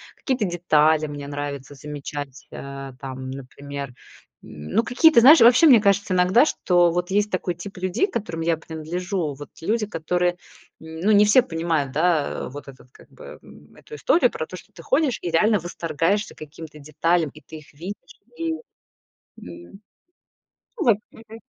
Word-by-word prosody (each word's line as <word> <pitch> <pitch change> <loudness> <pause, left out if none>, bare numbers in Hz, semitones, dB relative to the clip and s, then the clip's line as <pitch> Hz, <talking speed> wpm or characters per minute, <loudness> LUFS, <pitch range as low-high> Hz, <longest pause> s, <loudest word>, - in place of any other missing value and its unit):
Какие-то 255 -7 -1
детали 160 -3 +2
мне 145 -1 -7
нравится 145 -1 -6
замечать, 145 0 -8
э, 135 -1 -8
там, 130 -1 -7
например, 140 0 -8 0.5
ну, 75 - -3
какие-то, 285 +2 +5
знаешь, 290 +7 +8
вообще, 245 +7 +7
мне 240 -7 +7
кажется 200 -2 +2
иногда, 185 +9 +4
что 175 - +2
вот 180 +2 -2
есть 205 +1 +1
такой 180 -2 -2
тип 195 +3 -9
людей, 185 - 0
к - - -17
которым 200 -8 -4
я 165 0 +1
принадлежу. 160 +1 -4
Вот 145 +2 -11
люди, 215 +5 0
которые 180 -1 -1 0.4
ну, 160 +6 -2
не 210 0 +6
все 215 +5 +6
понимают, 165 - -2
да, 155 0 +1 0.2
э, - - -6
вот 145 +1 -10
этот, 130 -1 -15
как - - -19
бы, - - -12
м, - - -18
эту 450 - -12
историю 400 -6 +2
про - - -4
то, - - -10
что - - -13
ты - - -13
ходишь 310 - +1
и 175 - -3
реально 210 +5 +3
восторгаешься 170 +4 -2
каким-то 155 0 -11
деталям, 155 +1 0
и 155 - -15
ты 160 +3 -11
их 150 -1 -16
видишь 180 +8 -7 0.4
и 330 0 -2
м, 320 - -7 2.2
ну, 380 - -2
во-п 220 -4 +3
мгм. 225 0 -13
170 Hz, 165 wpm, -23 LUFS, 145-205 Hz, 2.2 s, знаешь